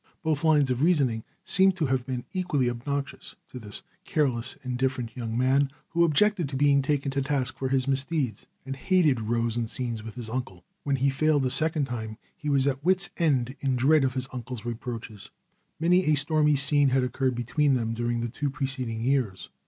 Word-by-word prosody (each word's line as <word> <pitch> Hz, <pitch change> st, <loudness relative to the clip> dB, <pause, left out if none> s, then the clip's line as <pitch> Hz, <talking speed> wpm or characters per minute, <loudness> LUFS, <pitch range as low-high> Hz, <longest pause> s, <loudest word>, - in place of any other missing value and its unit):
Both 155 Hz, -2 st, 0 dB
lines 150 Hz, -4 st, +3 dB
of 125 Hz, +1 st, -1 dB
reasoning 140 Hz, -9 st, +2 dB, 0.2 s
seem 190 Hz, 0 st, +6 dB
to 175 Hz, -4 st, -1 dB
have 130 Hz, -2 st, -1 dB
been 125 Hz, -2 st, -4 dB
equally 165 Hz, -9 st, 0 dB
obnoxious 135 Hz, +3 st, -4 dB
to 125 Hz, -, -8 dB
this 105 Hz, -3 st, -8 dB, 0.2 s
careless, 130 Hz, -6 st, 0 dB
indifferent 125 Hz, -2 st, -2 dB
young 115 Hz, -2 st, -4 dB
man, 135 Hz, +2 st, +2 dB, 0.2 s
who 170 Hz, 0 st, +2 dB
objected 175 Hz, +1 st, +2 dB
to 135 Hz, -, -5 dB
being 140 Hz, 0 st, +4 dB
taken 140 Hz, 0 st, -1 dB
to 140 Hz, 0 st, -1 dB
task 135 Hz, -2 st, 0 dB
for 130 Hz, -, -1 dB
his 130 Hz, -1 st, 0 dB
misdeeds, 135 Hz, -2 st, -1 dB, 0.2 s
and 135 Hz, 0 st, -4 dB
hated 155 Hz, -, +2 dB
"rows" 115 Hz, +1 st, -1 dB
and 115 Hz, -2 st, -2 dB
"scenes" 120 Hz, -3 st, -4 dB
with 110 Hz, 0 st, -9 dB
his 120 Hz, -3 st, -7 dB
uncle. 110 Hz, -7 st, -5 dB, 0.2 s
When 140 Hz, -1 st, 0 dB
he 135 Hz, +1 st, +1 dB
failed 145 Hz, +1 st, +2 dB
the 130 Hz, -, 0 dB
second 155 Hz, +1 st, +1 dB
time 110 Hz, -4 st, -6 dB, 0.2 s
he 150 Hz, -, -5 dB
was 135 Hz, -2 st, +3 dB
at 140 Hz, -2 st, +1 dB
his 140 Hz, -, -29 dB
wits' 185 Hz, +1 st, +2 dB
end 135 Hz, -6 st, +1 dB
in 135 Hz, -2 st, 0 dB
dread 140 Hz, +4 st, +4 dB
of 130 Hz, -1 st, 0 dB
his 130 Hz, 0 st, -2 dB
uncle's 125 Hz, -2 st, -7 dB
reproaches. 115 Hz, -3 st, -6 dB, 0.5 s
Many 180 Hz, +3 st, +3 dB
a 150 Hz, -, +3 dB
stormy 150 Hz, +1 st, +2 dB
scene 145 Hz, 0 st, +3 dB
had 130 Hz, 0 st, +2 dB
occurred 130 Hz, 0 st, -1 dB
between 135 Hz, +4 st, +1 dB
them 115 Hz, -2 st, -1 dB
during 120 Hz, 0 st, -2 dB
the 120 Hz, -, -1 dB
two 140 Hz, +5 st, -3 dB
preceding 130 Hz, -5 st, -3 dB
years. 125 Hz, -7 st, -1 dB
135 Hz, 200 wpm, -26 LUFS, 120-145 Hz, 0.5 s, seem